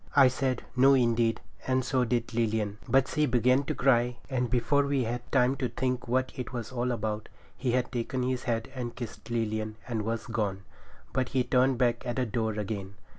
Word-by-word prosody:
I 135 -3 +8
said, 130 0 -1
'No, 135 +2 +6
indeed,' 115 -2 +2 0.3
and 130 -1 +1
so 130 -2 +2
did 120 0 -1
Lilian; 110 -2 0
but 130 +1 +4
she 150 0 +1
began 125 +2 +3
to - - -2
cry, 125 -2 +3
and 125 -2 0
before 125 +4 +2
we 140 -2 +1
had 120 +1 -4
time 130 0 +3
to 130 -2 -1
think 125 -1 -2
what 130 +2 +1
it 125 - -5
was 120 -3 -5
all 125 0 -1
about, 110 -2 -3 0.3
he 120 +3 -1
had 125 0 0
taken 125 +1 -2
his 125 0 -1
hat 115 -1 -1
and 125 -3 -5
kissed 120 -2 -8
Lilian 110 -2 -1
and 115 -3 -1
was 115 +1 -2
gone. 105 -4 -2 0.5
But 130 -1 0
he 130 -2 +1
turned 125 +1 +3
back 120 -1 +1
at 120 - -3
the 130 - +1
door 110 -1 -1
again. 100 -2 -4
120 Hz, 200 wpm, -29 LUFS, 115-130 Hz, 0.5 s, I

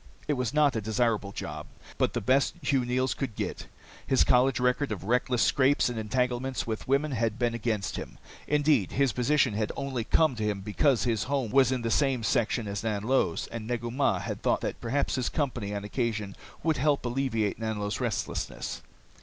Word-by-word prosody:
It 150 - +2
was 125 -4 -1
not 150 -4 +3
a 110 - 0
desirable 110 -2 0
job, - - -6 0.3
but - - +2
the - - -1
best 130 +6 +2
Hugh 135 -1 +2
Neils 130 +2 0
could 130 -7 -4
get. - - -4 0.4
His 130 - +4
college 130 +1 +3
record 125 +1 +1
of 100 -4 -4
reckless 125 +3 +1
scrapes 140 -1 +3
and 120 -2 -3
entanglements 125 +3 -1
with 110 -1 -4
women 140 +3 +2
had 115 -3 0
been 120 -1 0
against 110 -5 -2
him. - - -7 0.3
Indeed, 145 - +2
this 135 -2 +3
position 135 -1 +2
had 105 0 -1
only 135 -4 -2
come 155 +3 +3
to 110 - -2
him 105 -2 -1
because 120 +6 +2
his 115 -4 0
home 135 -5 -1
was 130 -1 +5
in 125 -2 -1
the 115 - -1
same 135 -4 +2
section 115 0 +1
as 100 0 -3
Nanlo's, 110 -3 0
and 115 -1 -6
Negu 120 -1 -2
Mah 135 +3 +2
had - - -5
thought - - +1
that - - -4
perhaps 135 +5 0
his 130 -3 0
company 120 -9 -2
on 100 - -4
occasion 110 -2 -2 0.3
would 160 -2 +1
help 140 0 +1
alleviate 120 -5 -1
Nanlo's 105 -2 -2
restlessness. - - -3
125 Hz, 190 wpm, -28 LUFS, 110-135 Hz, 0.4 s, was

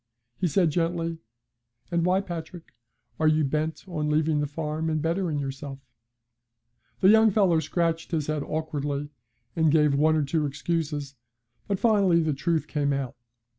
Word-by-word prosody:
He 185 - +1
said, 165 +1 +2
gently: 165 0 -1 0.7
'And 170 -1 +1
why, 185 +1 +3
Patrick, 175 -2 -8 0.5
are 160 - +3
you 155 0 +3
bent 155 +3 -2
on 155 -4 -2
leaving 155 0 +2
the 145 - 0
farm 155 +2 -3
and 155 -1 0
bettering 165 0 -1
yourself?' 135 -1 -6 1.1
The 190 - +6
young 220 +1 +6
fellow 190 -5 +3
scratched 165 +1 -1
his 160 -4 -1
head 155 -1 -2
awkwardly, 145 -2 -3 0.4
and 160 -2 +3
gave 150 -2 +4
one 155 +3 +3
or 155 - +2
two 150 +1 0
excuses, 150 -1 -3 0.5
but 200 - 0
finally 200 -6 +3
the 160 -2 +1
truth 160 +3 0
came 145 -2 0
out. 135 -3 -3
155 Hz, 155 wpm, -26 LUFS, 150-170 Hz, 1.1 s, The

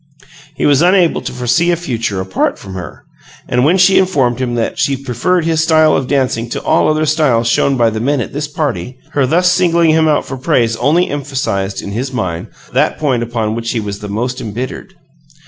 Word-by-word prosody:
He - - -1
was 145 0 +4
unable 180 -1 +3
to - - -5
foresee 125 +7 +1
a 175 - +3
future 115 - -3
apart 95 0 -1
from 95 - -10
her; 95 -2 -8 0.4
and 125 0 +1
when 165 +7 +3
she 190 +1 +5
informed 135 -10 +1
him 120 -2 -1
that 115 -1 -2
she 135 -1 +1
preferred 140 +7 -1
his 165 -1 +1
style 155 -1 +4
of 130 - -1
dancing 125 -4 0
to - - -4
all - - +2
other 155 0 +1
styles 145 -7 +2
shown 135 +3 +2
by 115 -2 +3
the 110 - -3
Men 140 +4 0
at 115 - -4
this 145 +1 -3
party, 130 - -3
her 140 -3 +1
thus 180 +5 +3
singling 170 -3 +3
him 160 0 +3
out 150 -1 +1
for 135 - -6
praise 125 -5 +1
only 155 +8 +2
emphasized, 130 -9 -3
in 100 - -6
his 125 +6 -3
mind, 90 -9 -3 0.3
that - - +1
point 135 -6 0
upon 115 -2 -2
which 115 0 -4
he 120 - -1
was 100 -2 -5
the 105 - -7
most 120 +5 -3
embittered. 125 - -6
130 Hz, 210 wpm, -15 LUFS, 115-155 Hz, 0.4 s, she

